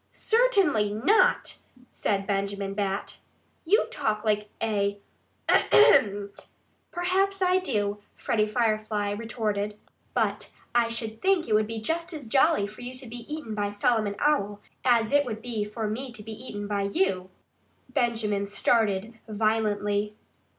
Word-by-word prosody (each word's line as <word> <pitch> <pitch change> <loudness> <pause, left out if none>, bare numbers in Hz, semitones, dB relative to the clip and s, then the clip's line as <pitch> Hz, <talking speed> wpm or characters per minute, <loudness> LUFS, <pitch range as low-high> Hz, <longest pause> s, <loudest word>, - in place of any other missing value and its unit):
"Certainly 395 - +2
not!" 310 - +3 0.3
said 195 -1 -1
Benjamin 200 0 -2
Bat. 195 -1 -3 0.5
"You 415 +8 +4
talk 215 0 -1
like 210 -1 +1
a 205 -2 0 0.5
AHEM!" 205 - +5 0.6
"Perhaps 380 +3 0
I 365 0 +4
do," 210 - -1 0.2
Freddie 215 -2 0
Firefly 215 -2 0
retorted. 210 -1 -2 0.4
"But - - -1 0.2
I 240 -1 +3
should 225 -1 -4
think 380 -3 +2
it 220 - 0
would 215 0 +3
be 225 0 -4
just 335 +10 -2
as 300 -5 -6
jolly 270 0 +3
for 210 +3 -10
you 250 +1 -6
to 255 +1 -6
be 240 +3 -9
eaten 300 -8 -5
by 205 -1 -1
Solomon 205 0 +1
Owl 210 -9 +1 0.2
as 235 -3 +3
it 285 0 +4
would 225 -5 -5
be 225 -2 -3
for 215 +1 -4
me 245 +5 -4
to 215 -3 -7
be 225 - -8
eaten 210 -3 -7
by 205 -1 -1
you." 190 -1 0 0.6
Benjamin 215 -4 0
started 215 +1 +1
violently. 210 -1 0
220 Hz, 140 wpm, -27 LUFS, 205-250 Hz, 0.6 s, AHEM